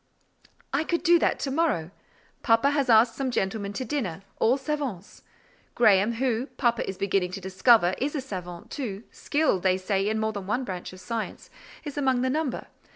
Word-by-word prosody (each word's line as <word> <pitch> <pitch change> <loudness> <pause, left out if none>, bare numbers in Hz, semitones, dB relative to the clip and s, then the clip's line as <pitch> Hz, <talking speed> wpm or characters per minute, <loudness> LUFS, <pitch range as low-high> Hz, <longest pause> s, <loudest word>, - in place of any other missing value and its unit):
"I 280 +3 +2
could 340 +1 -1
do 345 -1 +5
that - - +1
to 275 - -2
morrow. 270 - 0 0.5
Papa 230 +4 +3
has 280 -3 0
asked 225 +1 +6
some 270 -2 -2
gentlemen 200 -2 -2
to 255 - -4
dinner, 195 - -3 0.2
all 245 +4 +3
savants. 270 - -4 0.5
Graham, 215 -1 +4
who, 245 +1 -1
papa 235 -5 +1
is 190 - -5
beginning 195 -2 0
to 195 - -4
discover, 190 +1 +4
is 285 +4 -1
a 285 - -1
savant, 180 -8 -8
too—skilled, 235 - -1
they 185 0 +2
say, 195 +1 0
in 220 0 -1
more 220 0 -1
than 200 -2 -6
one 240 +6 0
branch 185 -6 -6
of 185 - -12
science—is 230 +7 -7
among 260 -3 +2
the 260 - +1
number. 300 -3 -2
230 Hz, 175 wpm, -26 LUFS, 195-270 Hz, 0.5 s, asked